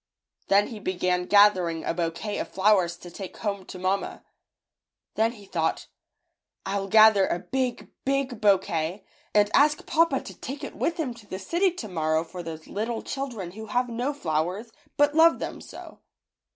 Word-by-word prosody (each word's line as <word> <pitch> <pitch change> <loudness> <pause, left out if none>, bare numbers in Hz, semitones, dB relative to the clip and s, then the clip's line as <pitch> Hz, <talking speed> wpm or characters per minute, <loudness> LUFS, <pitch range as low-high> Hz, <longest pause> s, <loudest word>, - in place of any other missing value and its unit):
Then 200 +1 +4
he 225 - -7
began 180 -2 -1
gathering 185 -6 +4
a - - 0
bouquet 170 +5 -3
of - - -3
flowers 190 -3 +2
to 175 0 -11
take 190 +1 -8
home 200 -3 -3
to - - -8
mamma. 185 +2 -2 0.9
Then 225 +1 +1
he 205 -4 -14
thought, 165 -4 -2 0.8
"Ifll 195 0 -2
gather 215 -2 +7
a - - 0
big, 255 +6 -3
big 270 -4 -1
bou 200 -2 +6
quet, 170 +3 -4 0.3
and 205 0 +4
ask 295 +1 +4
papa 320 -4 +2
to - - -9
take 275 +3 -7
it - - -6
with 335 - -1
him 290 -7 -2
to 230 -3 -16
the 190 - -5
city 345 - +1
tomorrow 160 - -1
for 175 +2 -8
those 160 -2 -8
little 225 +3 -3
children 240 -10 -5
who 220 +3 -9
have 245 +2 0
no 245 +4 -1
flowers, 185 - -2 0.3
but 290 0 +4
love 325 +1 +6
them - - -6
so." - - -11
205 Hz, 170 wpm, -26 LUFS, 180-245 Hz, 0.9 s, gather